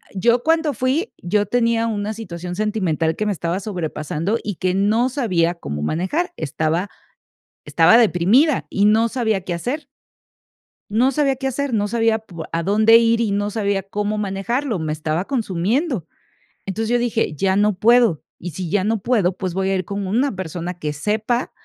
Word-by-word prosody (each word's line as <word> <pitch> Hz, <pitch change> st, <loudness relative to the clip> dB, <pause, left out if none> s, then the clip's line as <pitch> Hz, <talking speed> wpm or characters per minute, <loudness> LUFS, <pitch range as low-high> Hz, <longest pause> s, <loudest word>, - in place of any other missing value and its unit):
yo 235 Hz, +5 st, +2 dB
cuando 320 Hz, -2 st, +2 dB
fui, 265 Hz, -, -1 dB
yo 205 Hz, +4 st, +1 dB
tenía 230 Hz, +1 st, +1 dB
una 210 Hz, -1 st, -2 dB
situación 180 Hz, -5 st, -6 dB
sentimental 180 Hz, -7 st, 0 dB
que 215 Hz, -, -2 dB
me 210 Hz, -, +1 dB
estaba 170 Hz, -1 st, -2 dB
sobrepasando 175 Hz, 0 st, -3 dB
y 205 Hz, -2 st, -3 dB
que 185 Hz, +2 st, -1 dB
no 215 Hz, +6 st, +2 dB
sabía 185 Hz, -, 0 dB
cómo 75 Hz, -, -5 dB
manejar. 190 Hz, -, -1 dB
Estaba 160 Hz, +6 st, -1 dB, 0.8 s
estaba 230 Hz, -, +5 dB
deprimida 235 Hz, -, +3 dB
y 200 Hz, -, +1 dB
no 220 Hz, +2 st, +4 dB
sabía 220 Hz, -5 st, 0 dB
qué 180 Hz, -1 st, -5 dB
hacer. 260 Hz, -, -4 dB, 1.0 s
No 240 Hz, +6 st, +3 dB
sabía 275 Hz, -1 st, +1 dB
qué 270 Hz, -, -2 dB
hacer, 265 Hz, 0 st, -2 dB
no 205 Hz, -2 st, +1 dB
sabía 225 Hz, 0 st, +1 dB
pu 175 Hz, -7 st, -9 dB
a 165 Hz, 0 st, -1 dB
dónde 215 Hz, +4 st, +5 dB
ir 230 Hz, 0 st, +3 dB
y 220 Hz, -3 st, 0 dB
no 205 Hz, +1 st, 0 dB
sabía 200 Hz, -2 st, -1 dB
cómo 210 Hz, +2 st, -2 dB
manejarlo, 210 Hz, +4 st, -2 dB
me 155 Hz, -1 st, -2 dB
estaba 155 Hz, +3 st, -2 dB
consumiendo. 225 Hz, -, -1 dB, 0.6 s
Entonces, 220 Hz, +3 st, -3 dB
yo 240 Hz, 0 st, +2 dB
dije: 230 Hz, -7 st, 0 dB
"Ya 190 Hz, +5 st, +1 dB
no 205 Hz, +1 st, +3 dB
puedo". 230 Hz, -5 st, +4 dB
Y 175 Hz, -, -6 dB
si 175 Hz, +2 st, -5 dB
ya 195 Hz, +2 st, +1 dB
no 220 Hz, +1 st, 0 dB
puedo, 195 Hz, -6 st, +1 dB
pues, 185 Hz, -2 st, -4 dB
voy 190 Hz, +1 st, -1 dB
a 195 Hz, -, +1 dB
ir 185 Hz, -2 st, -2 dB
con 200 Hz, 0 st, -4 dB
una 250 Hz, +8 st, +1 dB
persona 180 Hz, -1 st, -5 dB
que 150 Hz, -2 st, -3 dB
sepa 220 Hz, -, -1 dB
205 Hz, 175 wpm, -20 LUFS, 180-235 Hz, 1.0 s, estaba